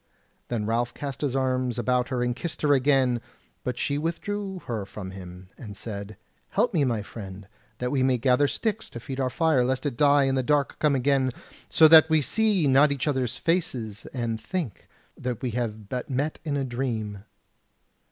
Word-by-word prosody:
Then 115 -3 -2
Ralph 120 +2 0
cast 140 -2 -5
his 140 -3 -1
arms 130 -2 0
about 125 +1 +1
her 125 -2 0
and 120 0 0
kissed 165 +4 -5
her 145 -1 +5
again; 130 -3 +3 0.4
but 125 -1 -3
she 140 +2 -1
withdrew 190 +4 -3
her 110 -4 -3
from 95 -1 -8
him, 90 -1 -10
and 105 -5 -8
said: 100 -1 -6 0.3
"Help 220 +3 +1
me, 160 -5 +3
my 115 -5 0
friend, 100 -2 -9 0.3
that 125 +1 -2
we 135 - +1
may 130 -1 +3
gather 125 +3 +3
sticks 220 +7 -2
to 120 - -8
feed 130 +3 -6
our 130 -1 +1
fire, 150 -1 +2
lest 130 +3 -1
it 140 -5 -2
die 145 -1 +5
and 135 0 +1
the 130 - +2
dark 145 +2 +1
come 150 -2 +3
again 135 0 +2 0.4
so 160 - +7
that 160 0 +8
we 160 0 +4
see 205 - +2
not 140 +2 +5
each 140 0 -2
other's 130 -3 0
faces, 125 - -2
and 115 -3 -3
think 165 - -4 0.3
that 125 -2 -4
we 125 - -1
have 110 -3 -3
but 125 +5 -4
met 140 +4 -1
in 145 -3 -1
a 140 - 0
dream." 115 -6 -3
130 Hz, 190 wpm, -26 LUFS, 115-145 Hz, 0.4 s, that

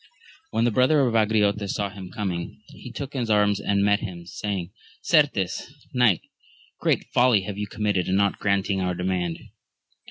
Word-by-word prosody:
HEN 115 - +1
the 120 - +3
brother 130 +6 +4
of 125 -4 +1
Angriote 105 -2 +2
saw 100 0 -2
him 95 -2 -9
com 100 -1 -3
ing, 85 0 -6
he - - -11
took 140 -1 -6
his 125 -4 -2
arms 105 -1 +3
and 100 0 +1
met 100 0 +3
him, 90 -5 -7
saying, 95 0 -4 0.3
Certes, 145 - +1 0.2
knight, 120 -9 +3 0.6
great - - +1
folly 120 -4 +4
have 100 +1 -6
you 105 - -3
com 105 +1 -6
mitted 100 -4 +1
in 95 - +1
not 100 0 +1
granting 100 -1 0
our 90 -1 -1
demand 90 -2 -1
100 Hz, 180 wpm, -24 LUFS, 95-110 Hz, 0.6 s, brother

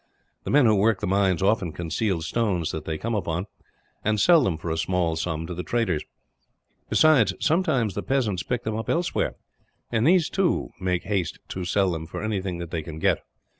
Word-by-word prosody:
The - - -3
men 145 -1 +5
who 110 - +5
work 105 +1 +3
the - - -2
mines 95 -1 +2
often 95 -5 +1
conceal 85 +1 -1
stones 90 -4 0
that 80 - -5
they 80 - -2
come 115 +7 -3
upon, 90 -3 -1 0.6
and 105 0 +1
sell 165 - +6
them 90 -8 0
for 85 0 -4
a 80 - -1
small 85 0 0
sum 80 0 -3
to 90 - -5
the 90 - -4
traders; 95 -6 0 0.9
besides, 155 -8 +4
sometimes 155 - +1
the 100 - -3
peasants 110 -7 0
pick 125 -2 -3
them 110 -1 -2
up 110 - -4
elsewhere 170 +1 0 0.6
and 115 +2 +2
these, 175 -2 +4
too, 190 -2 0
make 90 -2 -1
haste 95 -4 -1
to 95 -1 -4
sell 95 +1 +2
them 80 -1 -4
for 85 - -6
anything 95 -4 -2
that 85 -1 -7
they 80 - -2
can 80 0 -8
get. 80 - +2
95 Hz, 200 wpm, -25 LUFS, 85-115 Hz, 0.9 s, sell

